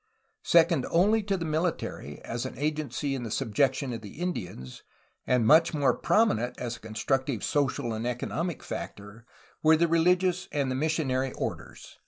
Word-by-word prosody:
Second 165 Hz, -5 st, +4 dB
only 205 Hz, +6 st, +3 dB
to 200 Hz, -1 st, -1 dB
the 165 Hz, -, -4 dB
military 155 Hz, -, -2 dB
as 120 Hz, +1 st, -4 dB
an -, -, -10 dB
agency 145 Hz, -1 st, -2 dB
in 135 Hz, -, -3 dB
the 115 Hz, -, -5 dB
subjection 130 Hz, +5 st, 0 dB
of 115 Hz, -, -5 dB
the 105 Hz, +7 st, -11 dB
Indians, 90 Hz, -, -5 dB, 0.5 s
and 125 Hz, -3 st, +3 dB
much 160 Hz, +6 st, +5 dB
more 140 Hz, -4 st, +3 dB
prominent 125 Hz, -, +1 dB
as 120 Hz, -1 st, -3 dB
a -, -, -19 dB
constructive 115 Hz, +3 st, -2 dB
social 135 Hz, -5 st, 0 dB
and 110 Hz, +2 st, -3 dB
economic 155 Hz, +7 st, -3 dB
factor, 105 Hz, +4 st, -8 dB, 0.3 s
were 160 Hz, 0 st, +5 dB
the 170 Hz, +1 st, +3 dB
religious 180 Hz, +2 st, +2 dB
of 140 Hz, -2 st, 0 dB
the -, -, -1 dB
mis 155 Hz, +4 st, 0 dB
sionary 130 Hz, -3 st, 0 dB
orders. -, -, -6 dB
140 Hz, 165 wpm, -28 LUFS, 120-165 Hz, 0.5 s, much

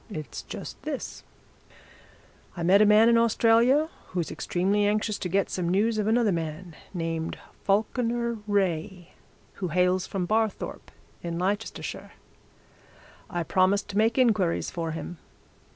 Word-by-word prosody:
'It's 155 Hz, -8 st, -6 dB
just -, -, -8 dB
this -, -, -5 dB, 1.3 s
I 170 Hz, -, -3 dB
met 190 Hz, +4 st, +5 dB
a 215 Hz, -, +6 dB
man 215 Hz, +2 st, +6 dB
in 235 Hz, 0 st, +5 dB
Australia 235 Hz, +5 st, +4 dB, 0.2 s
who's 175 Hz, -3 st, -3 dB
extremely 200 Hz, +3 st, 0 dB
anxious 210 Hz, 0 st, 0 dB
to 180 Hz, -, -3 dB
get 195 Hz, +2 st, +1 dB
some 175 Hz, -2 st, -1 dB
news 215 Hz, +4 st, +2 dB
of 210 Hz, -, 0 dB
another 225 Hz, -1 st, +3 dB
man, 165 Hz, 0 st, -4 dB, 0.2 s
named 165 Hz, -2 st, -3 dB, 0.3 s
Falkiner 235 Hz, +3 st, 0 dB
Wraye, 185 Hz, -3 st, -1 dB, 0.5 s
who 185 Hz, -, 0 dB
hails 180 Hz, +2 st, +1 dB
from 195 Hz, -3 st, -2 dB
Barthorpe, 220 Hz, +2 st, -1 dB, 0.3 s
in 170 Hz, -1 st, -4 dB
Leicestershire. 200 Hz, +5 st, -3 dB, 1.2 s
I 175 Hz, -2 st, -2 dB
promised 190 Hz, +4 st, +2 dB
to 200 Hz, -, -4 dB
make 225 Hz, +3 st, +2 dB
inquiries 215 Hz, -9 st, +2 dB
for 165 Hz, -2 st, -3 dB
him. 165 Hz, +1 st, -6 dB
195 Hz, 135 wpm, -27 LUFS, 175-220 Hz, 1.3 s, a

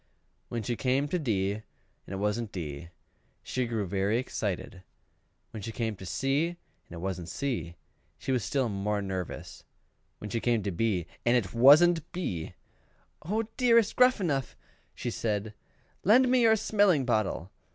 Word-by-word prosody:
When 115 Hz, -2 st, -3 dB
she 120 Hz, +3 st, -1 dB
came 130 Hz, +4 st, +1 dB
to 180 Hz, -, 0 dB
D, 100 Hz, -, 0 dB
and 105 Hz, +2 st, -5 dB, 0.5 s
it 95 Hz, -, -5 dB
wasn't 105 Hz, +3 st, -1 dB
D, 80 Hz, -2 st, -6 dB, 0.5 s
she 130 Hz, -1 st, -2 dB
grew 110 Hz, -3 st, -1 dB
very 100 Hz, +3 st, 0 dB
much 120 Hz, -, +2 dB
excited: 95 Hz, -6 st, -4 dB, 0.7 s
when 110 Hz, -, -7 dB
she 115 Hz, +3 st, -5 dB
came 110 Hz, -1 st, -2 dB
to 95 Hz, -, -9 dB
C, 135 Hz, -, +1 dB
and 175 Hz, -, -7 dB, 0.3 s
it 85 Hz, -, -8 dB
wasn't 90 Hz, -1 st, -4 dB
C, 85 Hz, -, -3 dB, 0.4 s
she -, -, -4 dB
was 125 Hz, -4 st, +1 dB
still 135 Hz, -3 st, 0 dB
more 105 Hz, 0 st, -1 dB
nervous; 95 Hz, -3 st, -5 dB, 0.5 s
when 105 Hz, -, -8 dB
she 115 Hz, -, 0 dB
came 115 Hz, -3 st, +1 dB
to 100 Hz, -, -2 dB
B, 95 Hz, -1 st, 0 dB, 0.2 s
and 120 Hz, +1 st, +4 dB
it 100 Hz, -6 st, -2 dB
wasn't 155 Hz, +7 st, +6 dB
B, 90 Hz, -, -4 dB, 0.7 s
"Oh, 210 Hz, +8 st, -1 dB
dearest 235 Hz, -4 st, +4 dB
Gruffanuff," 185 Hz, -, +2 dB, 0.4 s
she 120 Hz, -, -3 dB
said, 105 Hz, -1 st, -2 dB, 0.5 s
"lend 245 Hz, +6 st, +5 dB
me 255 Hz, -1 st, +4 dB
your 225 Hz, -1 st, +6 dB
smelling 200 Hz, -9 st, +3 dB
bottle!" 110 Hz, -6 st, 0 dB
115 Hz, 160 wpm, -29 LUFS, 100-145 Hz, 0.7 s, wasn't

